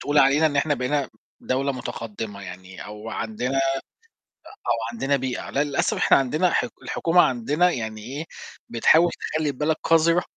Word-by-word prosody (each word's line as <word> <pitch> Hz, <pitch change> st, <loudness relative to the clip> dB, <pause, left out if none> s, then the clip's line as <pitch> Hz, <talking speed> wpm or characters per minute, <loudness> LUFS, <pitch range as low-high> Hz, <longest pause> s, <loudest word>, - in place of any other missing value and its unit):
تقول 145 Hz, +1 st, +1 dB
علينا 145 Hz, +3 st, +5 dB
إن 145 Hz, -2 st, -1 dB
إحنا 145 Hz, +1 st, +2 dB
بقينا 140 Hz, +2 st, -1 dB, 0.3 s
دَولة 135 Hz, +2 st, 0 dB
مُتقدّمة 110 Hz, -5 st, -6 dB
يعني 90 Hz, 0 st, -9 dB
أو 105 Hz, +2 st, -8 dB
عندنا، 115 Hz, +5 st, -3 dB
آآ، -, -, +3 dB, 1.1 s
أو -, -, +5 dB, 0.2 s
عندنا 135 Hz, +4 st, 0 dB
بيئة 130 Hz, -2 st, -4 dB
لأ 145 Hz, +2 st, +1 dB
للأسف 140 Hz, -1 st, 0 dB
إحنا -, -, +5 dB
عندنا 155 Hz, +7 st, +2 dB
حك -, -, 0 dB
الحكومة 175 Hz, +1 st, +3 dB
عندنا 150 Hz, +7 st, +2 dB
يعني 110 Hz, -5 st, -4 dB
إيه، 140 Hz, +7 st, -5 dB, 0.4 s
بتحاول 160 Hz, +9 st, +4 dB
تخلّي 155 Hz, -1 st, -2 dB
البلد 150 Hz, +3 st, 0 dB
قذرة 165 Hz, +2 st, +3 dB
135 Hz, 155 wpm, -24 LUFS, 115-155 Hz, 1.1 s, علينا